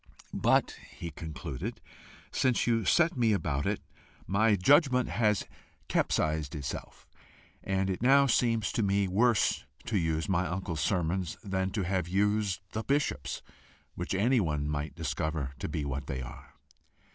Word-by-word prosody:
"But," - - +2
he 85 -1 -7
concluded, 75 -5 -6 0.5
"since 130 -3 +2
you 115 -3 +1
set 170 - +4
me 115 -4 +3
about 75 -7 -1
it, - - -1 0.4
my 105 +2 +3
judgment 125 - +4
has 105 -3 +1 0.4
capsized 75 -2 0
itself, 70 -2 -6 0.6
and 95 -1 0
it 95 0 -2
now 140 +3 +6
seems 115 -4 +2
to - - 0
me 100 -1 +2
worse 110 - +2 0.2
to 105 -4 0
use 80 -1 0
my 90 -1 +1
uncle's 85 -4 -3
sermons 90 +1 0
than 95 -2 -1
to 105 - -1
have 90 -2 -1
used 100 +1 +1
the 110 - -2
bishop's, 140 - -1 0.5
which 90 +2 -3
anyone 95 - +2
might 75 +1 -3
discover 75 -2 -2
to - - -3
be 75 -1 -2
what 70 0 -4
they 65 -1 -3
are." 60 - -11
95 Hz, 145 wpm, -30 LUFS, 80-110 Hz, 0.6 s, now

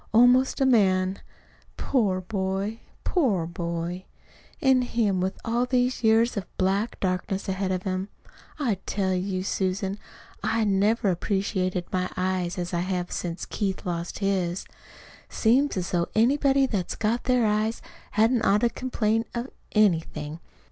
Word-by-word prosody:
"Almost 250 +4 +5
a 270 - +3
man. 190 -6 +3 0.6
Poor 200 -8 +1
boy, 195 +2 -2 0.2
poor 225 - +1
boy 170 +1 -4 0.5
an' 265 -1 +4
him 220 -6 0
with 190 +1 -1
all 240 +2 +1
these 250 0 +1
years 225 +2 +4
of 195 -4 -6
black 195 +4 0
darkness 190 +1 -2
ahead 190 0 -1
of 185 0 -2
him! 190 +1 -2 0.5
I 235 -10 0
tell 190 -2 0
you, 185 0 -1
Susan, 190 +1 -1 0.4
I 220 +2 +1
never 205 +1 +2
appreciated 185 -1 -1
my 185 0 0
eyes 185 -1 -1
as 175 +1 -4
I 170 - +1
have 180 0 -2
since 175 0 -4
Keith 195 -3 -3
lost 170 -1 -3
his. 190 -3 -1 0.6
Seems 255 +3 +2
as 180 -1 -2
though 170 -1 +1
anybody 270 +4 +4
that's 200 -8 -2
got 225 +3 -1
their 250 -2 +3
eyes 215 +2 +1 0.3
hadn't 225 +3 +3
ought 205 +1 +3
to 240 -1 +2
complain 225 -3 0
of 240 +3 -3 0.2
anything. 165 -6 +1
195 Hz, 140 wpm, -26 LUFS, 185-230 Hz, 0.6 s, Almost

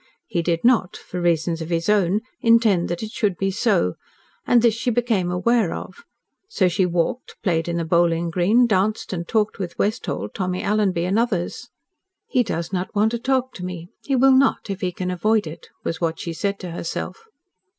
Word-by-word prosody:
He 175 - -1
did 165 0 -1
not 235 -6 +3
for 180 - -6
reasons 170 -1 +1
of 160 - -5
his 165 -1 -1
own 205 -1 +2 0.2
intend 230 -6 +4
that 175 +4 -3
it 215 - -5
should 205 -7 0
be 195 0 0
so, 195 - +1 0.5
and 240 -1 +4
this 235 -2 +5
she 230 +3 -2
became 225 -6 +1
aware 195 +2 +1
of. 470 - -9 0.4
So 195 - +2
she 180 +1 +1
walked, 175 +8 -2
played 165 -4 +1
in 170 0 -1
the 170 - -1
bowling 170 0 +2
green, 200 +8 +4
danced 210 -1 0
and 170 -2 -4
talked 215 -2 0
with 175 -3 -5
Westholt, 215 +2 -2
Tommy 185 -2 -2
Alanby 200 -4 +1
and 195 +5 +1
others. 210 -8 -2 0.6
"He 250 - +1
does 170 -5 -3
not 185 +2 -3
want 215 +2 +3
to 235 - -2
talk 260 +1 0
to 180 - -8
me. 175 -1 -6
He 275 - 0
will 265 +1 +5
not, 265 -5 +2
if 195 +2 -5
he 180 -2 0
can 180 +1 -3
avoid 215 +4 +1
it," 155 +1 -9
was 165 - -3
what 165 -1 -1
she 170 - -4
said 200 +4 -2
to 180 -2 -6
herself. 175 - -5
190 Hz, 200 wpm, -22 LUFS, 170-225 Hz, 0.6 s, this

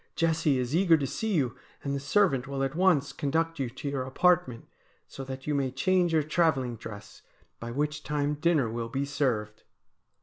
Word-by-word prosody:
Jessie 160 -4 +2
is 125 +3 -1
eager 175 -2 +5
to 140 - -2
see 200 - -2
you, 130 -7 0 0.3
and 140 - -2
the 140 - -1
servant 140 -3 +2
will 135 0 -2
at 135 +1 -1
once 170 -5 +2
conduct 165 +3 -1
you 130 -3 -1
to 130 +4 -7
your 140 -2 -1
apartment, 130 -2 +1 0.4
so 135 - -8
that 130 0 -7
you 150 - -1
may 140 -2 0
change 175 +6 +1
your 160 -2 +3
travelling 145 -6 +1
dress, 110 -2 -10 0.4
by 115 - -6
which 150 +5 -2
time 150 0 -1
dinner 150 -3 +2
will 115 +1 -4
be 135 +4 -2
served.' 125 -7 -1
140 Hz, 190 wpm, -28 LUFS, 130-160 Hz, 0.4 s, eager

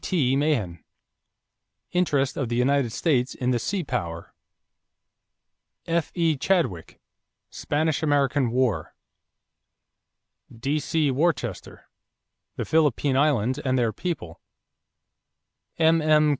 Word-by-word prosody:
T. 135 -8 +1
Mahan, 130 - 0 1.1
Interest 145 -7 +1
of 135 -5 -2
the 120 - -1
United 130 0 +2
States 130 -1 0
in 125 0 -1
the 120 - +1
Sea 190 - -2
Power. 85 - -4 1.5
F.E. 165 -1 0
Chadwick, 140 - -1 0.5
Spanish 155 +1 -1
American 145 -3 +2
War. 125 -3 -1 1.6
D.C. 150 +2 0
Worcester, 130 - -2 0.7
The - - -3
Philippine 145 -3 +2
Islands 130 -4 +2
and 130 -1 0
Their 115 -3 +1
People. 135 - -5 1.4
M.M. 155 -2 +4
140 Hz, 90 wpm, -25 LUFS, 125-155 Hz, 1.6 s, M.M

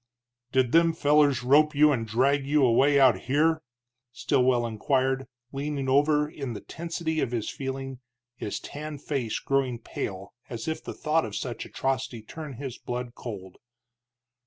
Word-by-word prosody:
"Did 130 -2 +2
them 165 0 +5
fellers 145 -5 +3
rope 150 +4 +4
you 150 +1 +6
and 115 -5 -1
drag 135 +5 +2
you 145 -1 +4
away 135 +4 +4
out 130 -3 +5
here?" 160 +3 +3 0.5
Stilwell 125 -1 +2
inquired, 130 +3 0 0.2
leaning 140 0 -3
over 150 +2 +3
in 140 -5 -6
the 105 - -7
tensity 165 -1 -3
of - - 0
his 115 -3 -2
feeling, 135 -1 -5 0.4
his 105 - -4
tanned 150 -1 -7
face 130 -7 -2
growing 135 -3 0
pale, 100 -4 -6 0.2
as 120 +2 -6
if 160 - -3
the - - -6
thought 160 +1 +1
of 105 -2 -5
such 120 +3 -4
atrocity 130 -4 -2
turned 150 +3 -8
his 130 -1 -6
blood 125 0 -5
cold. 95 -8 -8
135 Hz, 155 wpm, -27 LUFS, 120-150 Hz, 0.5 s, you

